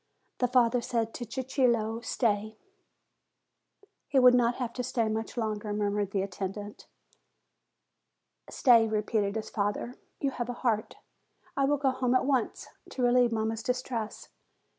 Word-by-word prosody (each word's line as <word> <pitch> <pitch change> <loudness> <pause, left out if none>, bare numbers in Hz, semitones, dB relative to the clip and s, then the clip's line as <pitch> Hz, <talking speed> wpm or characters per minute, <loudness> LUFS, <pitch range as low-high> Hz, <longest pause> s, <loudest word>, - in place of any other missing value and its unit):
The 250 - +3
father 245 -1 +3
said 230 -1 -2
to 240 - -5
Cicillo, 235 -3 0
"Stay." 215 -3 -1 1.5
"He 275 - 0
will 250 -1 +8
not 240 -1 +3
have 245 -3 -4
to 250 - -3
stay 230 -2 0
much 220 +2 -3
longer," 215 -2 -2
murmured 205 -1 0
the 195 -1 -1
attendant. 200 +2 -6 1.6
"Stay," 235 -4 +5
repeated 210 -1 0
his 220 - -4
father: 205 +3 -2 0.3
"you 275 - 0
have 240 -2 -4
a - - -2
heart. 220 -2 0 0.6
I 275 - +2
will 290 +1 +2
go 270 -1 +2
home 255 -1 0
at - - +3
once, 260 -4 -1 0.2
to 255 - -3
relieve 245 0 +4
mamma's 220 0 -1
distress. 245 -2 -3
230 Hz, 140 wpm, -29 LUFS, 215-250 Hz, 1.6 s, will